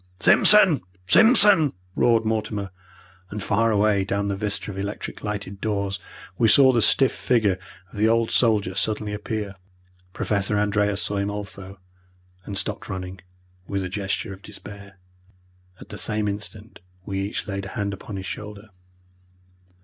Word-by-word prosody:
"Simpson! 190 - +6 0.2
Simpson!" 200 - +6 0.2
roared 115 -2 +3
Mortimer, 105 -3 -2 0.6
and 105 0 -5
far 115 +3 +2
away 105 -2 +2
down 100 +1 -2
the 100 - -1
vista 105 0 -3
of 95 - -9
electric 100 +2 -5
lighted 100 -2 -5
doors 100 -3 -2 0.4
we 115 - +4
saw 130 +4 +7
the 120 -2 +2
stiff 135 +4 +3
figure 105 -7 +1 0.3
of 105 - -7
the 110 - +4
old 115 0 +2
soldier 105 -6 +2
suddenly 105 +1 -2
appear. 105 -1 -4 0.6
Professor 100 +2 -1
Andreas 105 -1 +1
saw 100 - -2
him 100 +1 -1
also, 100 -2 -7 0.7
and 100 - -3
stopped 100 +2 -1
running, 95 -1 -6 0.5
with 100 -1 -2
a 90 - -4
gesture 95 0 -3
of 95 - -13
despair. 100 -1 -10 0.8
At - - -13
the 105 - -6
same 105 -1 -1
instant 105 +1 -6 0.3
we 95 -1 -3
each 100 +2 -3
laid 100 -1 -4
a - - -10
hand 100 -1 -1
upon 100 +1 -8
his 95 -1 -6
shoulder. 105 +1 -8
105 Hz, 150 wpm, -24 LUFS, 100-110 Hz, 0.8 s, saw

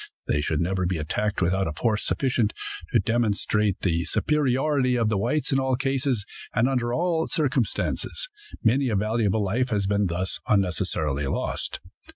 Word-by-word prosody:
They 75 - +1
should 75 0 0
never 95 +1 0
be 90 -1 -1
attacked 95 +6 -1
without 95 +2 +1
a - - -2
force 105 +7 0
sufficient 120 -5 +1 0.4
to - - +4
demonstrate 105 -3 +1
the 85 -3 +1
superiority 135 -2 +1
of 115 -3 +2
the 105 - +1
whites 130 +10 0
in 135 - +3
all 130 -1 +1
cases 135 -4 0 0.3
and 120 - +3
under 125 -3 0
all 165 +3 +1
circumstances. 140 - -1 0.4
Many 130 +4 +3
a 110 - 0
valuable 110 0 +1
life 120 +6 0
has 105 -3 0
been 100 0 +2
thus 90 +2 -2
unnecessarily 80 -7 0
lost. - - -2
110 Hz, 160 wpm, -25 LUFS, 95-130 Hz, 0.4 s, to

